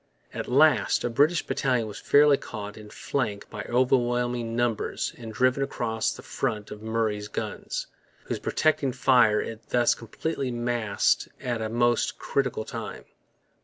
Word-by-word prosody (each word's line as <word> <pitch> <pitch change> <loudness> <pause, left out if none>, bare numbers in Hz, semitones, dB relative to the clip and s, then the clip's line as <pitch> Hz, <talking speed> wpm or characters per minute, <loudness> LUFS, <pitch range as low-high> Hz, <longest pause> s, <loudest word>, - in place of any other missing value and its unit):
At - - -4
last 145 +2 +4
a 120 - -1
British 150 +7 +3
battalion 125 -5 0
was 105 - -8
fairly 145 0 +5
caught 105 -4 -7
in 105 -1 -11
flank 105 -4 -3
by 105 - -5
overwhelming 120 -2 +1
numbers 120 -2 -1
and 115 -2 -8
driven 130 +4 +2
across 115 -5 -1
the - - -9
front 110 -6 -3
of 105 - -8
Murray's 110 -2 -1
guns, - - -4 0.4
whose - - -4
protecting 145 -4 +1
fire 125 -4 +4
it 115 0 -6
thus 120 -1 +3
completely 135 +4 -4
masked 120 -3 +1
at 120 -3 -2
a 110 - -2
most 120 +1 +1
critical 130 -5 -1
time. - - -7
120 Hz, 145 wpm, -26 LUFS, 110-130 Hz, 0.4 s, fairly